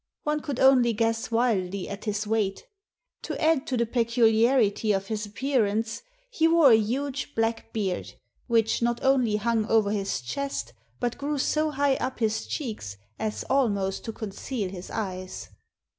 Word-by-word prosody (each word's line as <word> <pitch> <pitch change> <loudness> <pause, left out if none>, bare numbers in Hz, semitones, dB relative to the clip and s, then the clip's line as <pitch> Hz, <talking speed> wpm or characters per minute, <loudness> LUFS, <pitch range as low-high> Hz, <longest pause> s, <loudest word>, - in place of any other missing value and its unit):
One 300 0 0
could 285 -4 -4
only 255 -3 +5
guess 225 +1 0
wildly 200 -5 0
at 200 +2 -7
his 210 0 -1
weight 210 -2 -1 0.6
To - - -5
add 315 -4 +2
to 255 - -1
the 235 - +2
peculiarity 230 -2 +3
of 195 0 -1
his 210 0 -3
appearance, 225 -2 0 0.3
he 325 -9 +3
wore 330 -5 +6
a - - +9
huge 270 +6 -2
black 225 0 -1
beard, 195 -5 -3 0.3
which 225 -2 +2
not 235 0 0
only 255 -5 +3
hung 220 0 0
over 220 -3 +3
his 200 -6 -1
chest, 280 - -4 0.3
but 240 -1 -2
grew 290 +1 -2
so 305 +3 +1
high 280 -2 +1
up 260 - -3
his 220 -2 -1
cheeks 210 - -5 0.2
as 215 -1 -3
almost 200 -8 +1
to 225 - -3
conceal 215 0 -4
his 185 -1 -8
eyes. 185 -4 -5
225 Hz, 160 wpm, -26 LUFS, 210-265 Hz, 0.6 s, a